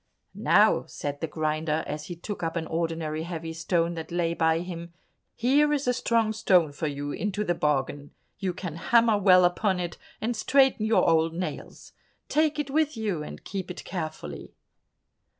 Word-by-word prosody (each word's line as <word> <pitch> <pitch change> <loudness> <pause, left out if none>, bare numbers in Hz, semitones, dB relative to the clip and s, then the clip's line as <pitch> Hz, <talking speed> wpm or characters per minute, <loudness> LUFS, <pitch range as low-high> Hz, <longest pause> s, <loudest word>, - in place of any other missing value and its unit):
"Now," - - +4
said 145 0 -5
the 160 - -1
grinder, 155 0 -1
as 150 +1 -5
he 175 - -6
took 200 +4 -6
up 165 0 -2
an 165 -1 -2
ordinary 160 -1 -2
heavy 165 -1 -5
stone 170 +1 0
that 165 -1 -7
lay 170 -1 0
by 160 0 +2
him, 170 -1 -7 0.4
"here 285 +5 +3
is 290 -3 0
a 250 - +3
strong 230 -3 +1
stone 185 -8 +3
for 155 +2 -3
you 145 0 -4
into 210 +4 -2
the 175 - +1
bargain; 145 -2 -1 0.3
you 190 -2 -1
can 175 -3 -6
hammer 230 +3 +4
well 185 -2 +6
upon 185 +1 +1
it, 175 -1 -4 0.2
and 235 +2 -1
straighten 265 -1 +3
your 220 - +3
old 165 0 +3
nails. 180 +1 -6 0.4
Take 305 0 +2
it 290 -2 -2
with 305 -2 +1
you 205 -8 -2
and 150 - -8
keep 190 -2 -5
it 180 - -7
carefully." 155 - -6
175 Hz, 175 wpm, -27 LUFS, 160-215 Hz, 0.4 s, well